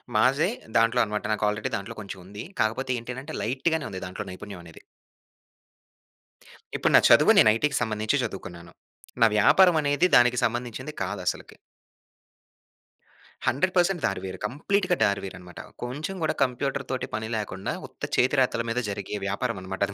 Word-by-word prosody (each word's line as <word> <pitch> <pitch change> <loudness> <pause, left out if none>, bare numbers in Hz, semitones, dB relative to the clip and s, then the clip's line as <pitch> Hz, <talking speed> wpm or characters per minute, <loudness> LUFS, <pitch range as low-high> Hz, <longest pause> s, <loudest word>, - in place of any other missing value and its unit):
మాదే 135 - +3 0.3
దాంట్లో 115 +2 +3
అన్నమాట 105 -1 -3
నాకు 105 - -1
ఆల్రెడీ 105 +1 -3
దాంట్లో 100 +4 -8
కొంచెం 100 -2 -8
ఉంది. 100 +3 -8 0.2
కాకపోతే 115 +4 0
ఏంటి 120 +2 -7
అని 130 - -6
అంటే 155 +2 -7
లైట్‌గానే 145 +7 0
ఉంది 95 -1 -6
దాంట్లో 90 - -6
నైపుణ్యం 95 -1 -9
అనేది. 80 - -14 2.0
ఇప్పుడు - - +1
నా - - +10
చదువు - - +7
నేను 110 - +7
ఐటీ‌కి 140 +4 0
సంబంధించి 110 +5 0
చదువుకున్నాను. 85 -4 -7 0.5
నా - - +8
వ్యాపారం 180 - +6
అనేది 145 +4 +2
దానికి 125 0 +5
సంబంధించింది 120 +3 -2
కాదు 95 +1 -4
అసలకి. - - -3 1.9
100% 175 +6 +2
దారి 100 - -1
వేరు. 95 - -6
కంప్లీట్‌గా 180 - 0
దారి 100 -1 +1
వేరు 95 -2 -6
అన్నమాట. 90 -1 -12 0.2
కొంచెం 145 +10 -4
కూడా 155 - +1
కంప్యూటర్‌తోటి 130 0 -2
పని 110 0 -4
లేకుండా 95 -2 -4
ఉత్త - - -21
చేతి 130 +3 +3
రాతల 125 -2 +1
మీద 120 - 0
జరిగే 100 +1 -5
వ్యాపారం 115 +3 -2
అన్నమాట 95 0 -7
అది 100 - -7
115 Hz, 155 wpm, -26 LUFS, 100-140 Hz, 2.0 s, నా